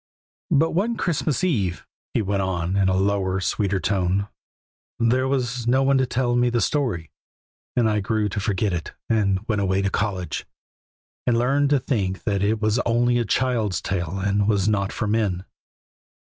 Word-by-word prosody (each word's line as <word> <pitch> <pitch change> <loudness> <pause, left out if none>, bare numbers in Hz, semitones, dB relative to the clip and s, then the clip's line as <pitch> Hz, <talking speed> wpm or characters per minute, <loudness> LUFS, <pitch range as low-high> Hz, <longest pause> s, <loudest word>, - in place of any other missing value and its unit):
"But 160 0 +3
one 220 +7 0
Christmas 160 -2 -1
eve," 105 - 0 0.3
he - - +2
went 100 0 0
on 90 -1 -1
in 95 -1 +3
a 95 - +2
lower, 95 -1 +1
sweeter 100 0 0
tone, 95 +1 0 0.7
"there 125 +3 +2
was 125 -3 -1
no 130 +2 +3
one 135 0 +3
to 130 - +1
tell 120 -1 0
me 120 0 +3
the 120 0 +1
story, 115 - -1 0.6
and 120 -2 +3
I 105 -1 +1
grew 105 +1 0
to 105 - -3
forget 100 -1 0
it 85 -2 -4 0.2
and 100 -2 +1
went 105 -3 0
away 95 0 +1
to 100 - 0
college, 95 -4 -2 0.8
and 120 -1 +3
learned 140 +4 +2
to 145 -1 +3
think 100 -8 -2
that 100 -2 0
it 105 +2 +1
was 110 +2 +1
only 120 0 +2
a 120 - 0
child's 115 -4 0
tale 90 -1 -3
and 100 +1 +1
was 100 -2 +2
not 100 -2 +1
for 110 - -3
men. 105 -4 0
105 Hz, 175 wpm, -23 LUFS, 95-125 Hz, 0.8 s, But